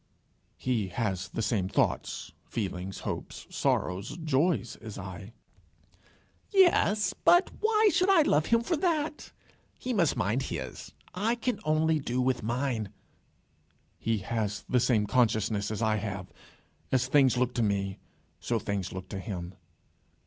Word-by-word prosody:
"He 120 -6 0
has 95 -2 -2
the 115 - -3
same 105 -4 0
thoughts, - - -1 0.2
feelings, 95 -3 -4
hopes, - - -5
sorrows, 95 - 0
joys, 150 -3 +1
as 110 -2 -9
I." 95 +2 -8 1.2
"Yes; 215 - +4
but 350 - +4
why 435 -1 +4
should 365 +2 +3
I 365 -5 +6
love 150 - +2
him 230 0 +4
for 335 +9 0
that? 310 -2 -1 0.5
He 255 - -3
must 170 -9 +2
mind 105 +8 +1
his, 65 - -6 0.2
I 215 +6 +1
can 240 -2 -2
only 155 0 +2
do 125 -2 -2
with 125 -1 +1
mine." 120 -2 -1 1.1
"He 115 0 0
has 105 -3 -2
the 125 - +3
same 115 -3 +2
consciousness 110 -3 +1
as 110 +1 -2
I 110 -1 +2
have. 100 -3 -4 0.7
As 130 -1 +3
things 130 -2 +4
look 125 0 +1
to 120 - 0
me, 100 -2 0 0.4
so 120 - -1
things 100 -3 -3
look 95 0 -7
to 100 - -5
him." 90 -3 -5
120 Hz, 140 wpm, -29 LUFS, 100-165 Hz, 1.2 s, I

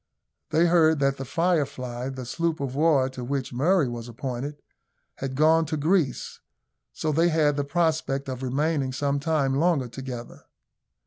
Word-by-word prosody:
They 165 +2 +3
heard 165 -2 +4
that 140 -1 +1
the 135 - -5
Firefly, 135 -6 -1
the 130 -2 -6
sloop 165 +5 -1
of 135 -2 -3
war 145 -2 +3
to 130 -1 -7
which 135 0 -3
Murray 155 +4 +3
was 120 -1 -6
appointed, 135 +3 -5 0.6
had 135 -1 -4
gone 160 +2 +4
to 155 - -2
Greece, 155 -3 0 0.5
so 155 - -2
they 165 +3 +3
had 155 -3 +2
the 145 - 0
prospect 150 -3 0
of 130 -1 -5
remaining 135 +1 0
some 140 +1 0
time 145 -3 +1
longer 145 -2 +2
together. 120 -1 -8
140 Hz, 155 wpm, -25 LUFS, 130-160 Hz, 0.6 s, heard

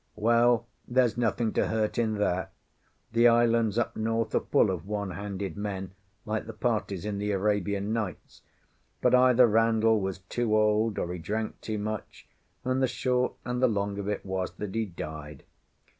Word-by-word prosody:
Well, 115 +1 +3 0.2
there's 125 -2 +2
nothing 115 -1 0
to - - +1
hurt 110 0 -1
in 110 -2 +1
that; 95 -3 -1 0.6
the 115 +1 +5
islands 115 -2 +3
up 120 - 0
north 115 0 -1
are - - +4
all - - -15
full - - +3
of 90 -1 -5
one 100 -2 -3
handed 100 0 -5
men, 100 -2 -4 0.3
like 110 0 -3
the 115 - -6
parties 105 -5 -1
in 105 -1 -3
the 105 0 -2
"Arabian 100 +1 0
Nights"; 105 -7 -5 0.6
but - - +2
either 125 0 +6
Randall 110 -1 +3
was 95 -1 -2
too 110 +4 -1
old, 105 0 +2
or 90 - -2
he 90 - -5
drank 110 +6 -3
too 110 -1 -3
much, 110 +1 -5 0.4
and 130 +1 +1
the 130 - +4
short 125 0 0
and 125 0 -2
the 130 - +6
long 100 -2 -1
of 100 - -4
it 105 -1 -3
was 95 -1 -2
that 105 -2 -6
he 115 -1 -1
died. 75 -4 -8
110 Hz, 180 wpm, -28 LUFS, 100-115 Hz, 0.6 s, either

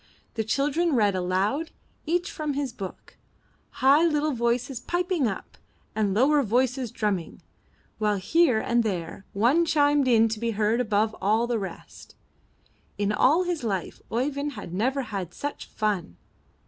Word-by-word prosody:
The 220 - -1
children 290 +8 +1
read 205 -4 +3
aloud, 190 - 0 0.4
each 350 +4 0
from 305 -2 -3
his 275 -4 -2
book, 195 -5 -9 0.7
high 285 +4 +7
little 305 -2 +2
voices 240 +1 -1
piping 350 -1 0
up, 195 - -6 0.3
and 210 -2 0
lower 275 +8 +4
voices 250 +1 0
drumming, 205 -6 -3 0.6
while 210 -1 +2
here 305 - +3
and 235 +2 +1
there 185 -2 -4
one 245 +12 +3
chimed 290 -4 +3
in 225 -2 +5
to 220 0 -3
be 230 0 -1
heard 220 +3 +2
above 215 -1 +1
all 215 +4 +2
the 240 -2 -1
rest. 195 - -9 0.8
In 205 0 0
all 295 +11 +4
his 350 -6 -3
life 195 -6 -3
Oeyvind 280 +4 -1
had 205 -7 -8
never 260 +8 0
had 195 -7 -5
such 290 0 -5
fun. 195 - -2
235 Hz, 150 wpm, -26 LUFS, 210-290 Hz, 0.8 s, high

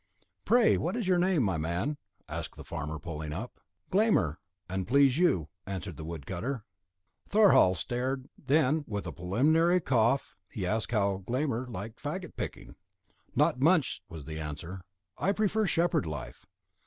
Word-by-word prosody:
"Pray, 240 -1 +5
what - - -1
is 235 -5 -2
your 180 -1 +4
name, 180 -6 +3
my 95 -6 +1
man?" 85 - -1 0.3
asked - - -5
the - - -8
farmer 75 +2 -4
pulling 80 -2 -6
up. 105 +11 -6 0.3
"Glámr, 190 - +3 0.3
an 95 +1 -2
please 135 - +4
you," 95 - +3 0.2
replied 95 -2 -5
the 80 - -8
wood 80 -3 -6
cutter. 115 - -4 0.6
Thorhall 200 - +6
stared; 130 +4 -2
then, 150 +1 +2
with 105 -2 -3
a - - -4
preliminary 155 - +3
cough, 125 -3 +1
he 95 - -4
asked 110 +4 0
how 100 -4 +1
Glámr 130 -1 -1
liked 110 +3 -7
faggot 170 +4 -5
picking. - - -6 0.6
"Not 125 - +3
much," 150 - +3
was 80 -4 -8
the 80 0 -6
answer; 80 +5 -6 0.4
"I 195 - +2
prefer 215 0 +1
shepherd 170 - +1
life." 75 -3 -7
120 Hz, 155 wpm, -30 LUFS, -, 0.6 s, Thorhall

